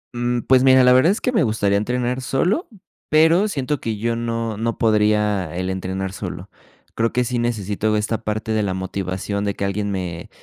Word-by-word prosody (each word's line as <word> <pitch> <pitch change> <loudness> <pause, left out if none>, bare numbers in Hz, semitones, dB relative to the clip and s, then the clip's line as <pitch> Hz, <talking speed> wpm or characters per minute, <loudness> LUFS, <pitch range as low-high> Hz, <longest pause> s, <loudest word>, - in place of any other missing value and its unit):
Mm, 120 0 -1
pues 130 -1 +4
mira, 130 -1 +6
la 125 0 +6
verdad 135 +9 +5
es 210 - -2
que 250 - 0
me 225 - +2
gustaría 105 -5 +1
entrenar 125 +3 -1
solo, 180 - 0 0.4
pero 165 +6 +4
siento 145 -5 -2
que 110 -2 -3
yo 115 +2 -1
no, 115 -2 -3
no 115 +1 -2
podría, 105 -5 +1
el 95 +1 -2
entrenar 95 +1 -4
solo. - - -7 0.5
Creo 115 0 +1
que 125 - +1
sí 120 0 -2
necesito 110 -2 -1
esta 105 +1 -2
parte 110 +1 -3
de 110 -1 +1
la 95 -2 -1
motivación, 95 +2 -3
de 100 -1 -2
que 100 - -2
alguien 100 +1 -2
me 90 -3 -4
110 Hz, 195 wpm, -21 LUFS, 100-125 Hz, 0.5 s, mira